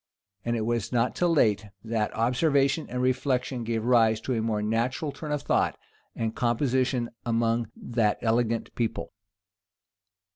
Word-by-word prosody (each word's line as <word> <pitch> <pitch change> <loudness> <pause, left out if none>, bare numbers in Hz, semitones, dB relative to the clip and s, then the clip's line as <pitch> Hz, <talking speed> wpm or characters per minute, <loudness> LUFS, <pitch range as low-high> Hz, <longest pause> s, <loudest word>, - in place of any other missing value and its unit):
And 120 0 0
it 110 -2 -1
was 115 -2 -1
not 120 0 +1
till 175 -1 +2
late, 110 -9 +3 0.2
that 110 -2 -1
observation 140 +5 +2
and 125 0 -2
reflection 130 -1 0
gave 115 -1 -2
rise 115 -3 +4
to 130 - -2
a 115 - 0
more 110 -2 -1
natural 120 +7 -1
turn 150 +1 -7
of 145 -1 -1
thought - - +1 0.4
and 110 -1 -2
composition 125 0 +1
among 115 -1 +1
that 115 -3 0
elegant 115 0 0
people. 115 -2 -3
120 Hz, 145 wpm, -27 LUFS, 115-130 Hz, 0.4 s, rise